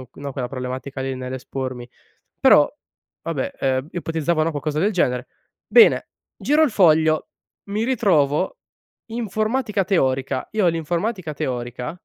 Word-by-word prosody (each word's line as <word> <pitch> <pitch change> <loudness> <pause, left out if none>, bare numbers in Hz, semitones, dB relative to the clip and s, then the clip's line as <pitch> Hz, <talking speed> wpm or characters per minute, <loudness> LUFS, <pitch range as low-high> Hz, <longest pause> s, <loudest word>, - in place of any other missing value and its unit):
o 125 - -14
no, 140 -1 -5
quella 125 -2 -3
problematica 130 +1 -5
lì 130 0 -2
nell'espormi. 130 -1 -5 0.5
Però, - - +6 0.5
vabbè, 160 -6 -3
ehm, 130 +2 0
ipotizzavano 165 -1 0
qualcosa 150 0 -2
del 210 +3 +2
genere. 125 -6 0 0.4
Bene, 460 -2 +5 0.3
giro 300 +2 +2
il 300 - +3
foglio, 160 -5 +3 0.4
mi 215 +2 0
ritrovo 185 - +2 0.5
informatica 220 -1 -1
teorica. 135 -7 0
Io 210 -4 +2
l'informatica 170 +2 -1
teorica 125 -3 -4
155 Hz, 120 wpm, -22 LUFS, 130-195 Hz, 0.5 s, Però